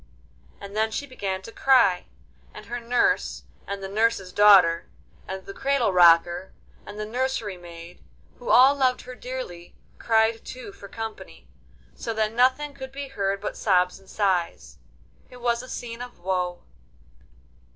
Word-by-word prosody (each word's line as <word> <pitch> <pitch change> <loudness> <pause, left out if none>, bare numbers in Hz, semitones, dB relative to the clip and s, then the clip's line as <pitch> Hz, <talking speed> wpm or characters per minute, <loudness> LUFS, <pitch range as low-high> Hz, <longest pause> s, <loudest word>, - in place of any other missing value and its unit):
And 200 0 -10
then 220 +1 +1
she 250 +6 -4
began 195 -8 -4
to 230 - -9
cry, 230 -9 +3 0.5
and - - -10
her 245 +1 -5
nurse, 240 +1 0 0.2
and 200 0 -5
the - - -3
nurse's 205 -2 0
daughter, 190 -5 +6 0.4
and 190 0 -6
the 195 - -8
cradle 270 -6 +1
rocker, 175 +1 +4 0.3
and 205 - -9
the 215 - -3
nursery 240 -3 -2
maid, 170 -1 -12 0.4
who - - -7
all 265 - +7
loved 260 -3 +1
her 255 - -10
dearly, 250 -10 -8 0.2
cried 225 0 +2
too 255 -5 -9
for 200 - -12
company, 215 - -8 0.5
so 220 - -5
that 215 0 0
nothing 260 +5 +2
could 265 -1 -9
be 275 0 -7
heard 200 -6 -2
but 210 - -4
sobs 180 -2 +1
and 195 -1 -21
sighs. 190 -5 -1 0.5
It 250 - -13
was 235 -1 0
a 255 - -11
scene 235 -1 -6
of 245 0 -9
woe. 180 -1 -2
215 Hz, 155 wpm, -25 LUFS, 190-250 Hz, 0.5 s, all